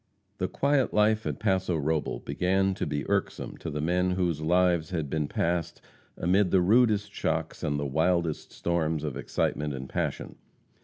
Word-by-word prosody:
The - - 0
quiet 140 -2 +1
life 110 +1 +3
at - - -2
Paso 95 -5 +1
Robel 80 +1 -1
began 95 +1 +1
to - - -3
be 70 -2 -3
irksome - - -1
to - - -6
the 75 0 -3
men 90 +3 +1
whose 90 -4 0
lives 85 0 +2
had 80 -6 -3
been 75 -2 0
passed 85 +1 -1 0.4
amid 95 +2 +2
the 95 - +4
rudest 105 +1 +3
shocks - - -2
and 70 0 -1
the 70 - -2
wildest 80 +3 0
storms 80 -3 -1
of 75 -4 -3
excitement 75 -1 -1
and 65 0 -6
passion. - - -3
85 Hz, 165 wpm, -28 LUFS, 75-95 Hz, 0.4 s, the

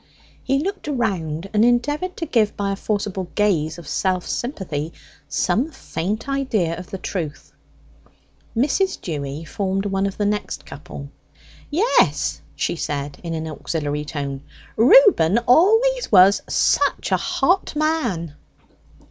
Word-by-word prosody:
He 270 +1 +1
looked 360 +3 -3
around 195 - -2
and 210 +1 +4
endeavoured 290 +10 +1
to 330 - -3
give, 225 -8 +1
by 200 -1 -1
a - - -1
forcible 200 -2 -2
gaze 175 -7 +1
of 170 -4 -11
self 185 -2 0
sympathy, 170 - -3 0.4
some 260 +8 +1
faint 215 - -4
idea 230 -12 0
of 180 0 -9
the 195 - -5
truth. 165 -5 -5 1.0
Mrs. 300 +10 +1
Dewy 145 -1 -5
formed 195 +2 -2
one 195 0 0
of 195 - -6
the 205 - 0
next 210 0 -2
couple. 140 -1 -9 0.6
"Yes," 390 +11 +2
she - - -1
said, 145 -3 -4
in 165 -2 -4
an 160 0 -3
auxiliary 150 -1 -3
tone, 140 -3 -4 0.3
"Reuben 240 - +6
always 450 - +4
was 195 0 +7
such - - +1
a - - +4
hot 365 -3 +1
man." 250 - -1
200 Hz, 130 wpm, -22 LUFS, 165-275 Hz, 1.0 s, was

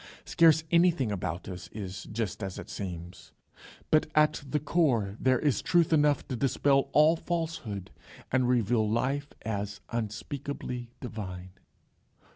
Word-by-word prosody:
Scarce 160 -2 +5
anything 170 -9 +3
about 90 -3 -3
us 90 -1 -7
is 95 -3 -6
just 110 -2 -3
as 95 -2 -4
it - - -8
seems, 90 -2 -7 0.6
but 155 0 +4
at 150 -1 +3
the 150 - +1
core 135 - +1
there 130 -1 +3
is 135 -4 +1
truth 170 -2 +3
enough 150 -2 +3
to 130 - -3
dispel 135 +2 +2
all 155 +2 +5
falsehood 160 - -4 0.4
and 130 -1 +2
reveal 115 -2 +2
life 135 +6 0 0.2
as 105 -2 -3
unspeakably 120 +2 -4
divine. 95 -6 -6
120 Hz, 130 wpm, -29 LUFS, 100-150 Hz, 0.6 s, Scarce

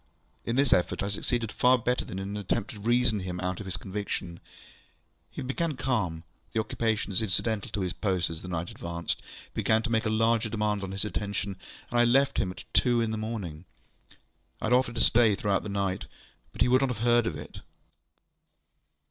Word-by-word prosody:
In 115 - 0
this 135 -1 +4
effort 90 - +2
I 100 - -1
succeeded 115 +2 -1
far 125 +1 +5
better 125 +1 0
than 95 - -7
in 95 +1 -4
the 105 - -3
attempt 105 +2 -1
to 105 - -10
reason 120 0 +2
him 90 -1 -4
out 90 0 -2
of 105 - -6
his 95 - -3
conviction. 95 -3 -4 0.9
He - - -6
became 145 +3 -1
calm; 100 -11 -1 0.3
the 115 - +1
occupations 110 -3 0
incidental 110 +1 -1
to 100 - -3
his 90 -2 -1
post 95 -5 0
as 80 - -7
the - - -8
night 85 -1 -3
advanced 85 -1 -4 0.3
began 110 0 +2
to 115 - -2
make 110 -1 +2
larger 115 +1 +2
demands 105 -2 0
on 95 - -4
his 95 +2 -3
attention: 100 -1 -2 0.4
and 120 - +2
I - - +7
left 135 +4 +4
him 95 - +1
at 90 - -8
two 120 -2 +4
in 115 -1 +1
the - - -1
morning. 105 -7 -4 0.9
I - - -3
had 115 - +2
offered 125 -1 +3
to 115 - 0
stay 115 -3 +5
through 100 -1 +1
the 105 - -7
night, 100 -2 -1 0.5
but - - -8
he - - +6
would 130 +1 +5
not 125 -4 0
hear 120 +2 +4
of 110 -9 -1
it. 75 - -9
105 Hz, 200 wpm, -28 LUFS, 95-120 Hz, 0.9 s, I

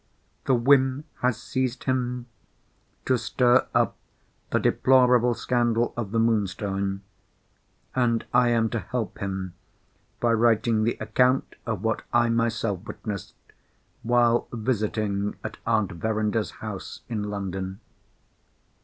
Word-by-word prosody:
The 130 - +3
whim 130 +2 +3 0.2
has 125 -1 +1
seized 130 -1 -2
him 125 -2 -1 0.8
to 130 -2 +2
stir 125 +2 +3
up - - +2 0.5
the - - +1
deplorable 125 -2 +4
scandal 120 -1 +1
of 115 -4 -3
the 115 - -2
Moonstone: 100 -3 0 0.9
and 120 -3 +1
I 125 0 +5
am 115 -1 +2
to 115 - -1
help 120 -1 -4
him 95 -2 -4 0.7
by 120 -1 +2
writing 115 -1 +3
the 115 - 0
account 125 +4 +2
of 110 -4 -2
what 110 -1 0
I 120 0 +3
myself 115 -4 0
witnessed 105 -4 -6 0.7
while 120 0 +3
visiting 105 -3 -1
at 110 -1 -6
Aunt 110 -3 +2
Verinder's 110 +3 -1 0.2
house 105 -3 -6
in 115 -4 -3
London. 95 -1 -4
115 Hz, 120 wpm, -25 LUFS, 105-120 Hz, 0.9 s, I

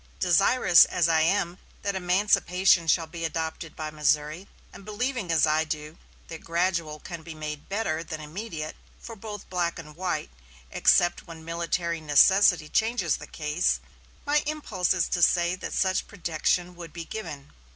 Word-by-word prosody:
Desirous 185 0 +5
as 170 -2 +1
I 160 -1 +3
am 175 +1 +1 0.2
that 200 -1 -1
emancipation 185 -1 +2
shall 165 0 +3
be 165 +1 -8
adopted 160 0 -4
by 155 -1 -5
Missouri, 150 +4 0 0.3
and - - -12
believing 215 -1 -3
as 160 -2 +4
I 155 +1 +2
do 155 0 -6 0.3
that 165 - -9
gradual 170 -3 -1
can 170 0 -8
be 160 0 -9
made 150 -1 -7
better 195 -6 -1
than 160 -2 -6
immediate 155 0 -6 0.2
for 230 - -9
both 205 -1 -8
black 175 -2 -1
and 150 -2 -10
white, 175 - -3 0.4
except 175 +1 +3
when 165 -1 -11
military 170 0 -2
necessity 160 +2 +5
changes 220 -4 +1
the - - -10
case, 155 +3 0 0.5
my 295 +1 +2
impulse 255 -12 -1
is 175 - +1
to 175 - -1
say 175 0 +3
that - - -6
such 185 -1 0
protection 175 0 -1
would 170 -3 -10
be 170 -1 -6
given. 160 -9 -7
170 Hz, 160 wpm, -26 LUFS, 155-190 Hz, 0.5 s, Desirous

